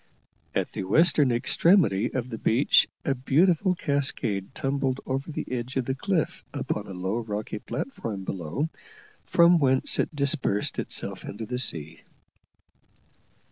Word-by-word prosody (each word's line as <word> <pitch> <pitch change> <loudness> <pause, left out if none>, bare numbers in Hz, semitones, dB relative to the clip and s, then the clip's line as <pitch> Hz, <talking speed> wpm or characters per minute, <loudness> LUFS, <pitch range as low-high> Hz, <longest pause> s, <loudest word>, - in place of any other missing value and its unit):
At - - -1
the - - -4
western 150 - +4
extremity 120 - +3
of 130 -1 -3
the 115 - -5
beach 120 +6 +4 0.2
a 140 - +2
beautiful 170 +8 +2
cascade 130 - -1
tumbled 135 -2 -1
over 135 +4 -3
the - - -4
edge 125 0 -4
of 130 - 0
the 130 - -1
cliff 165 +4 -1
upon - - -3
a - - -8
low 95 +5 -2
rocky 105 -1 -4
platform 110 - -5
below, 95 - -3 0.6
from 170 0 +5
whence 130 -2 +2
it - - -1
dispersed 140 -7 0
itself - - -2
into 110 +2 -6
the 125 +2 -3
sea. 80 - 0
130 Hz, 140 wpm, -26 LUFS, 105-145 Hz, 0.6 s, from